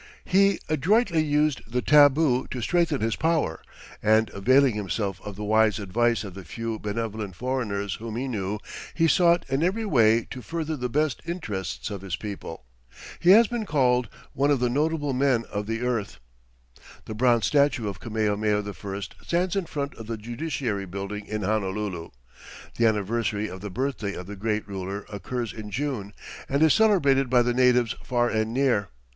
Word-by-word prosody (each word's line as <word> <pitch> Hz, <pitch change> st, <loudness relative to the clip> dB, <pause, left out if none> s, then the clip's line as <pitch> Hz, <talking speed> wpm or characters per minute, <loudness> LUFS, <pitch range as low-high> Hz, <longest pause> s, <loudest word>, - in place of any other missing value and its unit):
He 195 Hz, +1 st, +4 dB
adroitly 170 Hz, -, +2 dB
used 150 Hz, -1 st, +1 dB
the 125 Hz, +1 st, -1 dB
tabu 145 Hz, -3 st, +5 dB
to 130 Hz, -, -5 dB
strengthen 165 Hz, +1 st, +1 dB
his 115 Hz, 0 st, 0 dB
power, 160 Hz, -, 0 dB, 0.4 s
and 110 Hz, 0 st, +3 dB
availing 130 Hz, +6 st, +4 dB
himself 100 Hz, -2 st, -3 dB
of 105 Hz, -1 st, -7 dB
the 105 Hz, -, -6 dB
wise 110 Hz, 0 st, +3 dB
advice 115 Hz, +3 st, 0 dB
of 100 Hz, -3 st, -8 dB
the 95 Hz, 0 st, -9 dB
few 115 Hz, +5 st, -5 dB
benevolent 105 Hz, -2 st, -4 dB
foreigners 105 Hz, -5 st, -2 dB
whom 110 Hz, -1 st, -6 dB
he 130 Hz, +3 st, -2 dB
knew, 105 Hz, -4 st, -2 dB, 0.4 s
he 165 Hz, -1 st, +3 dB
sought 170 Hz, +2 st, +4 dB
in 135 Hz, +2 st, 0 dB
every 195 Hz, +6 st, 0 dB
way 115 Hz, -, +4 dB
to 130 Hz, -, -6 dB
further 160 Hz, +2 st, -3 dB
the 125 Hz, -3 st, -3 dB
best 150 Hz, +1 st, 0 dB
interests 110 Hz, -, -4 dB
of 100 Hz, -2 st, -5 dB
his 95 Hz, -4 st, -3 dB
people. 90 Hz, -, -7 dB, 0.5 s
He 175 Hz, -, +2 dB
has 220 Hz, +5 st, +8 dB
been 225 Hz, -1 st, -4 dB
called 125 Hz, -5 st, +2 dB, 0.2 s
"one 140 Hz, +2 st, +1 dB
of 145 Hz, -3 st, +3 dB
the 125 Hz, -1 st, +1 dB
notable 145 Hz, +1 st, 0 dB
men 130 Hz, -3 st, +2 dB
of 105 Hz, 0 st, -3 dB
the 115 Hz, +1 st, -2 dB
earth." 120 Hz, -5 st, -2 dB, 0.9 s
The -, -, -6 dB
bronze 120 Hz, 0 st, +3 dB
statue 140 Hz, -6 st, +2 dB
of 100 Hz, -2 st, -5 dB
Kamehameha 105 Hz, -1 st, 0 dB
I 100 Hz, +3 st, -6 dB, 0.2 s
stands 180 Hz, +2 st, 0 dB
in 195 Hz, -4 st, -1 dB
front 140 Hz, -3 st, -4 dB
of 115 Hz, -1 st, -10 dB
the 115 Hz, -1 st, -3 dB
Judiciary 120 Hz, -3 st, -3 dB
Building 100 Hz, +3 st, -6 dB
in 105 Hz, -1 st, -3 dB
Honolulu. 100 Hz, -4 st, -2 dB, 0.7 s
The 115 Hz, -, +4 dB
anniversary 110 Hz, 0 st, 0 dB
of 95 Hz, -1 st, -8 dB
the 105 Hz, -, -5 dB
birthday 120 Hz, -2 st, -3 dB
of 90 Hz, -, -7 dB
the 105 Hz, +2 st, -8 dB
great 105 Hz, +1 st, -2 dB
ruler 100 Hz, +1 st, -5 dB
occurs 115 Hz, +4 st, -4 dB
in 110 Hz, -2 st, -8 dB
June, 110 Hz, -3 st, -3 dB, 0.4 s
and 140 Hz, +3 st, +2 dB
is 160 Hz, -, +6 dB
celebrated 145 Hz, -, +3 dB
by 125 Hz, -1 st, +4 dB
the 120 Hz, 0 st, 0 dB
natives 125 Hz, -2 st, +3 dB
far 120 Hz, -1 st, +1 dB
and 110 Hz, 0 st, -1 dB
near. 120 Hz, -7 st, +1 dB
115 Hz, 175 wpm, -25 LUFS, 105-140 Hz, 0.9 s, has